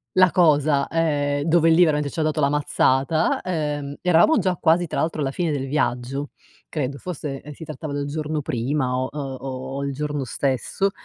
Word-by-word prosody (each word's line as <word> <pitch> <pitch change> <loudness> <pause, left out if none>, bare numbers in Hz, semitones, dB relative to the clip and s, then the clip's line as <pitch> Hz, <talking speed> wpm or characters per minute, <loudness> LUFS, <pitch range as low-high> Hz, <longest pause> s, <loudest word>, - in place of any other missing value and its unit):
la 185 -1 +6
cosa, 150 -4 +3
ehm, 145 -3 0
dove 165 0 +4
lì 165 - +4
veramente 150 -3 +1
ci 170 - -5
ha 155 - +2
dato 155 0 0
la 140 -1 +3
mazzata, 145 +1 +1
ehm, 150 -5 -3
eravamo 180 - +4
già 185 -1 +1
quasi 170 +1 +3
tra - - -3
l'altro 160 -1 -1
alla 135 -1 0
fine 170 +1 -1
del 135 -2 -2
viaggio, 135 0 -1 0.4
credo 140 -2 -3
forse 150 -6 -5
si 160 - -10
trattava 155 -1 -6
del 145 0 -2
giorno 150 +1 -3
prima 125 +2 -1
o 130 - -1
o 150 - -6 0.6
o 140 - -3
il 140 - -2
giorno 145 0 -3
stesso, 135 - -1
150 Hz, 185 wpm, -23 LUFS, 140-160 Hz, 0.6 s, la